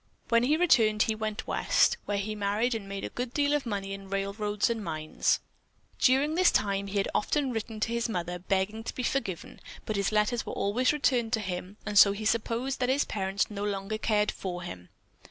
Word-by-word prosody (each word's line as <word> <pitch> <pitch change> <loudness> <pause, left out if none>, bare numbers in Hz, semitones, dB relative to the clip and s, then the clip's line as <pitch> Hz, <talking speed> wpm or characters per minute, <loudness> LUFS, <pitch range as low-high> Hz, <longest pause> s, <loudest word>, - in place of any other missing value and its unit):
When 230 0 +4
he 285 +6 +3
returned 225 -11 +4
he 220 - 0
went 215 -1 -4
West, - - +2
where 205 - -1
he 205 +2 -2
married 210 +4 0
and 205 -3 -5
made 195 0 -5
a - - -3
good 245 0 -5
deal 290 0 +2
of 290 -4 0
money 195 -2 -3
in 195 -1 -9
railroads 200 +1 -1
and 230 -2 -2
mines. 155 -3 0 0.6
During 275 +4 +3
this 365 +2 +5
time 200 -1 0
he 200 +1 -3
had 195 - +1
often 275 +4 0
written 225 -1 -4
to 230 - 0
his 235 0 -1
Mother 180 -3 -3
begging 195 +4 -1
to - - -5
be 250 - -3
forgiven, 200 -10 -3 0.3
but 215 - -2
his 200 +1 0
letters 215 +3 +1
were - - -6
always 235 +6 +1
returned 250 -6 +1
to 225 - +3
him 185 0 -5
and 210 -1 +4
so 200 - +8
he 215 +2 -6
supposed 230 +4 0
that 250 -1 +1
his 275 +2 +2
parents 195 +1 -1
no 205 -1 -4
longer 205 +1 -2
cared 210 -1 +2
for 180 -2 -5
him. 90 - -8
210 Hz, 210 wpm, -29 LUFS, 195-235 Hz, 0.6 s, so